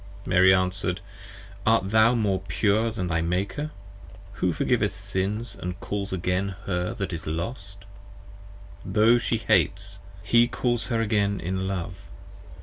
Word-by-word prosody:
Mary 95 +1 +5
answer'd, 95 0 +1 0.6
Art 110 -3 +2
thou 110 +2 +5
more 100 -5 +1
pure 110 +2 +2
Than 105 -5 -3
thy 85 -2 0
Maker, 95 - -2 0.6
who 90 -2 0
forgiveth 90 +3 0
Sins 100 +4 -2
& 90 0 -6
calls 100 -1 -4
again 95 +1 -1
Her 90 -2 -2
that 100 -2 -3
is 80 -2 -6
Lost? 100 +4 -5 1.0
Tho' 110 +5 +4
She 115 - 0
hates, 100 -1 +1 0.2
he 120 +5 +4
calls 120 -1 -1
her 115 -2 0
again 100 -2 +1
in 95 +2 -2
love. 95 0 -5
100 Hz, 135 wpm, -25 LUFS, 90-110 Hz, 1.0 s, Mary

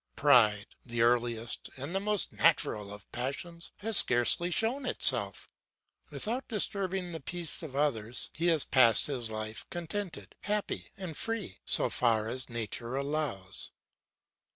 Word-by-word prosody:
Pride, 115 -7 +4 0.2
the 120 -1 -1
earliest 120 -1 0
and 140 +6 -5
the 195 - +1
most 210 0 0
natural 110 -10 +2
of 105 -1 -11
passions, 155 +7 -5
has 220 -1 +2
scarcely 125 +8 +4
shown 230 - +1
itself. - - +2 0.6
Without 240 +5 -3
disturbing 190 -4 -2
the 165 - -5
peace 170 +3 -1
of 150 -5 -8
others, 125 -5 -1
he 170 +2 -1
has 160 -4 +3
passed 120 -5 +5
his 125 -6 -3
life 110 0 -4
contented, 175 +2 -6
happy, 210 0 -3
and 185 -5 -5
free, 225 - -4
so - - +3
far 110 -3 +2
as 130 +3 -2
nature 115 +1 -3
allows. 140 -9 -3
140 Hz, 135 wpm, -30 LUFS, 115-175 Hz, 0.6 s, passed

